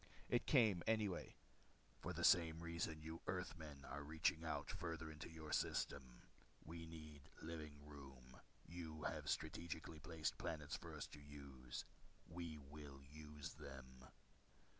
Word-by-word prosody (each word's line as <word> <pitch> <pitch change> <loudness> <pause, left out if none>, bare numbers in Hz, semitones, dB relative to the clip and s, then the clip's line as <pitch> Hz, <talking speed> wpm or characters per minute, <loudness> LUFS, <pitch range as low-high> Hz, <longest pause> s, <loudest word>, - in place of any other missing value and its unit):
It 120 - +4
came 110 - +8
anyway. 105 -5 +3 0.6
"For - - -1
the - - -1
same 80 -1 +8
reason 85 -2 0
you 80 +1 -4
Earthmen 80 -6 -2
are 70 +2 -3
reaching 80 +3 +3
out 75 -3 0
farther 80 -3 -2
into 75 0 -5
your 80 -2 -5
system. 65 -3 +1 0.4
We 80 +1 -4
need 75 -3 -8
living 80 -3 -4
room. 65 -3 -9 0.3
You 80 -3 -4
have - - 0
strategically 80 -1 0
placed 80 0 0
planets 75 -3 0
for - - -5
our - - -5 0.2
use. 70 -3 -5 0.4
We 85 -2 -3
will 70 -1 -8
use 75 0 -6
them." 65 -1 -8
80 Hz, 130 wpm, -46 LUFS, 70-85 Hz, 0.6 s, came